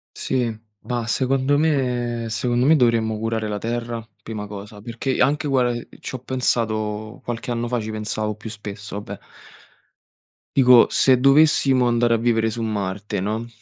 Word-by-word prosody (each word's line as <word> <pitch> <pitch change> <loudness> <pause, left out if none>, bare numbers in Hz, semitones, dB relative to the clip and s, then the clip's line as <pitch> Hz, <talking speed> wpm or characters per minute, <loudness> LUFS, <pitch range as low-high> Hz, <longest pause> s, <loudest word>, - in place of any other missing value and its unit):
Sì, 130 -2 -1 0.4
ma 120 -2 -3
secondo 135 +3 +1
me 125 -6 0
secondo 120 +3 0
me 160 - +6
dovremmo 115 -5 +2
curare 110 0 -2
la 105 - -3
terra, 115 +1 -4
prima 105 -1 -6
cosa, 105 0 -9
perché 120 +5 -3
anche 145 +3 +2
guarda, 125 -3 +2
ehm, 120 0 -5
ci - - -7
ho 130 - -4
pensato 110 -4 -2
qualche 120 0 -5
anno 120 0 -1
fa 120 0 -1
ci 110 - -5
pensavo 105 0 -3
più 110 +1 -8
spesso, 105 -2 -8
vabbè 105 - -7 1.4
dico 125 -3 +7
se 130 -2 +4
dovessimo 135 -2 +4
andare 120 0 +2
a - - +3
vivere 115 -1 +1
su 115 +1 -5
Marte, 100 -3 -3
no 110 +4 -2
115 Hz, 160 wpm, -22 LUFS, 110-125 Hz, 1.4 s, dico